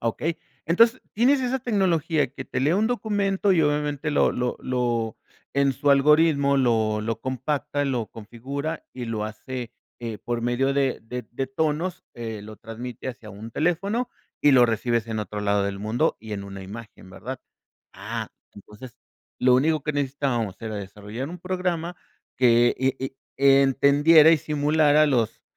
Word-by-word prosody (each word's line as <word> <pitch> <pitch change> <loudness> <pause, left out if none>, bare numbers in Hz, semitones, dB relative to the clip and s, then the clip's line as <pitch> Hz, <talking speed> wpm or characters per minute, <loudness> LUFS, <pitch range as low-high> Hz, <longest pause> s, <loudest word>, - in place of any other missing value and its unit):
Okey. 155 +8 -2 0.3
Entonces, 230 +9 +4
tienes 260 +6 +4
esa 260 +1 0
tecnología 170 - +1
que 135 -1 -7
te - - -3
lee 145 +4 +2
un 215 +3 +2
documento, 205 -4 +1
y 165 -4 +3
obviamente 150 0 0
lo 145 - +3
lo 125 0 -2
lo 120 -3 -1 0.4
en 140 0 +3
su 145 - +1
algoritmo 140 0 +4
lo 110 -4 +2
lo 115 +1 -3
compacta, 145 +3 -2
lo 125 -5 -1
configura 130 +8 -6
y 125 - -5
lo 110 -2 -2
hace, 115 +3 -6 0.3
eh, 115 -2 -4
por 120 +1 -3
medio 120 +3 +1
de 135 -2 +1
de 125 +1 -6
de 135 +2 -3
tonos, 160 +5 -2
eh, 115 -3 -6
lo 110 0 -10
transmite 120 +3 -7
hacia 120 -3 -8
un 105 +3 -9
teléfono, 195 - 0 0.3
y 145 - +6
lo 125 -2 +7
recibes 115 0 0
en 110 -1 -3
otro 105 0 -5
lado 100 -1 +1
del 100 0 -3
mundo 110 +3 0
y 110 0 -8
en 100 -1 -4
una 100 -1 -8
imagen, 105 -1 -11
¿verdad? 125 +7 -7 0.5
Ah, - - -5 0.2
entonces, 105 +5 -12 0.4
lo 125 0 +4
único 155 +2 +2
que 150 - -2
necesitábamos 135 -7 -1
era 110 -1 -4
desarrollar 105 +6 -6
un 180 - -7
programa, 180 -1 -2 0.4
que 120 -1 +5
e 130 0 +1 0.4
e 140 0 +6
entendiera 145 +4 +6
y 165 - +5
simulara 150 +1 +3
los 120 -6 0
135 Hz, 160 wpm, -24 LUFS, 115-155 Hz, 0.5 s, lo